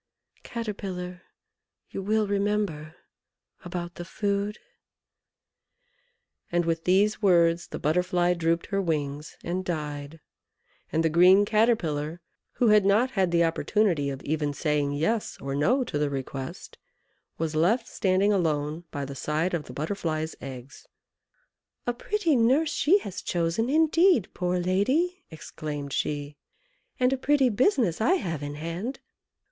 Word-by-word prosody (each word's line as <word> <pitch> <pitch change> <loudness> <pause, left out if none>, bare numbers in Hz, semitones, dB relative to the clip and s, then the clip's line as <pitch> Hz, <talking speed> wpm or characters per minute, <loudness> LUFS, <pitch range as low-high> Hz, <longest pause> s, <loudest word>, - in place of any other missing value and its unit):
Caterpillar! 190 -6 -5 0.7
you - - -4
will 215 +2 +1
remember 200 -6 -1 0.7
about 175 -1 -5
the 175 - -7
food 200 +3 -2 0.9
" 485 -1 -45
And 175 0 +1
with 165 0 -1
these 205 +4 +3
words 170 -3 +3
the - - -6
Butterfly 180 +2 +1
drooped 170 0 0
her 195 - +2
wings 150 -4 -3
and 180 +2 -2
died; 150 -3 -5 0.7
and 160 - +1
the - - +4
green 180 +5 +6
Caterpillar, 175 -9 +1 0.3
who 240 - +2
had 210 -1 +6
not 215 +6 +3
had 190 -6 +1
the 170 0 +3
opportunity 165 -2 +1
of 135 -1 -6
even 150 -1 -1
saying 150 -2 0
Yes 205 +10 -1
or 135 0 -4
No 225 - +2
to 145 -11 -3
the 150 -1 +1
request, 135 -1 -6 0.6
was 160 -1 -2
left 215 +10 +2
standing 195 +2 +2
alone 155 -2 -1
by 140 -1 -4
the 140 - -7
side 155 +6 -1
of 160 -4 -2
the 125 - -10
Butterfly's 160 +1 -3
eggs. 130 0 -9 1.0
"A 245 - 0
pretty 335 +4 0
nurse 260 +7 +3
she 320 +8 +4
has 200 - -6
chosen, 175 +7 -1
indeed, 320 - +3
poor 180 0 -1
lady!" 260 - +1
exclaimed 150 -3 -6
she, 145 0 -2 0.6
"and 250 +1 +3
a - - 0
pretty 270 0 +3
business 230 - +2
I 305 +12 +4
have 165 - -3
in 145 0 -5
hand! 170 - -5
180 Hz, 140 wpm, -27 LUFS, 155-215 Hz, 1.0 s, green